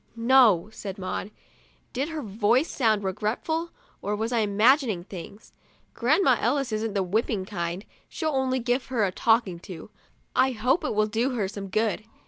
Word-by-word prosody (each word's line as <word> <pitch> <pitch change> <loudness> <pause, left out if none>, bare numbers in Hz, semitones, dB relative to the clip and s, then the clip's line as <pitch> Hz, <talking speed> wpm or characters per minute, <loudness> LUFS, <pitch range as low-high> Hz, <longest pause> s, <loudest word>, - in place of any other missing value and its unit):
" - - -37
No," 230 -6 +5
said 195 -3 -7
Maud. 185 +1 -4 0.6
Did 275 +5 -2
her 315 -3 -5
voice 225 - +1
sound 220 -5 +1
regretful, 230 - -2 0.3
or 205 +2 -2
was 220 +3 -2
I 235 - +2
imagining 215 - +3
things? 195 +3 -10 0.2
" - - -37
Grandma 265 +1 +3
Ellis 265 +1 0
isn't 215 -1 -2
the 195 - +2
whip 205 +6 0
ping 195 -5 -2
kind; 175 -1 -4 0.2
she'll 315 -2 -2
only 265 -2 0
give 245 +1 -1
her 245 -5 0
a 190 - -1
talking 220 -4 +1
to. 180 +2 -10 0.4
I 260 0 +3
hope 250 +9 +1
it 300 - -2
will 215 0 +3
do 235 +5 -1
her 210 -5 0
some 200 0 -7
good." 215 +2 0
225 Hz, 180 wpm, -26 LUFS, 200-255 Hz, 0.6 s, No